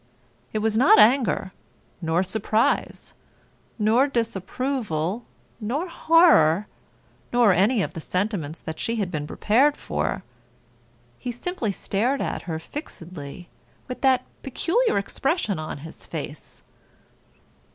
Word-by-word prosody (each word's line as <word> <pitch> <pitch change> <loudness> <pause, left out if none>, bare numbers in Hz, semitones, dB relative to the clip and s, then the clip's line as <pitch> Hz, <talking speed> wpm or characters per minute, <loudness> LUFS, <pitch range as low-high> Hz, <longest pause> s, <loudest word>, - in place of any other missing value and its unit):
It 215 -1 -2
was 220 -1 +1
not 245 +4 +6
anger, 220 -4 +4 0.5
nor 165 +2 +1
surprise, 215 +3 0 0.6
nor 230 +5 +3
disapproval, 230 - -2 0.3
nor 260 - -2
horror, 310 - +5 0.7
nor 240 -5 +5
any 200 +5 +3
of - - -4
the 165 - -6
sentiments 180 -4 -2
that 160 0 -6
she 230 - -1
had 200 -5 -2
been 150 -3 -3
prepared 260 - +2
for. 75 +1 -2 1.0
He 245 - -4
simply 245 - -3
stared 235 +8 -1
at - - -2
her 160 - -1
fixedly 175 - -8 0.4
with 250 - -6
that 265 -2 +3 0.2
peculiar 345 - +1
expression 210 - -1
on 155 -2 -5
his 160 - -12
face. - - -8
215 Hz, 115 wpm, -24 LUFS, 180-255 Hz, 1.0 s, not